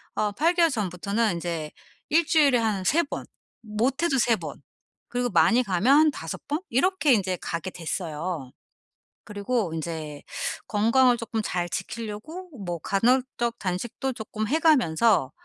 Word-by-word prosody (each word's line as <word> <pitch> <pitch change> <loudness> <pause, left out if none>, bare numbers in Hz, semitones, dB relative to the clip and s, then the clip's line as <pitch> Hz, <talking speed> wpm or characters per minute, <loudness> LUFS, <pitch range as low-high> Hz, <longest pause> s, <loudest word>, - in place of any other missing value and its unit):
아 210 -1 0
8 325 - +2
개월 340 -1 +5
전부터는 205 0 -1
인제 165 -3 -4 0.4
일주일에 305 -4 +4
한 215 -4 0
3 330 - +3
번. 285 - -6 0.4
못해도 265 +8 0
3 235 -1 +4
번. 155 -6 -8 0.5
그리고 245 0 -1
많이 230 +6 +4
가면 215 +7 +3
한 310 0 +5
5 165 - -7
번. 295 +2 0
이렇게 305 +3 +3
인제 190 -4 +1
가게 170 +2 -4
됐어요. 165 -4 -4 0.7
그리고 205 -2 -2
인제 155 -2 -5 0.5
건강을 235 +4 +4
쪼끔 230 -1 -3
잘 175 -3 -1
지키려고 230 - -6 0.2
뭐 175 -1 -3
간헐적 235 +4 +1
단식도 220 +8 -3
쪼끔 215 -2 -4
해 310 - +2
가면서 225 - +3
220 Hz, 255 characters per minute, -26 LUFS, 180-260 Hz, 0.7 s, 개월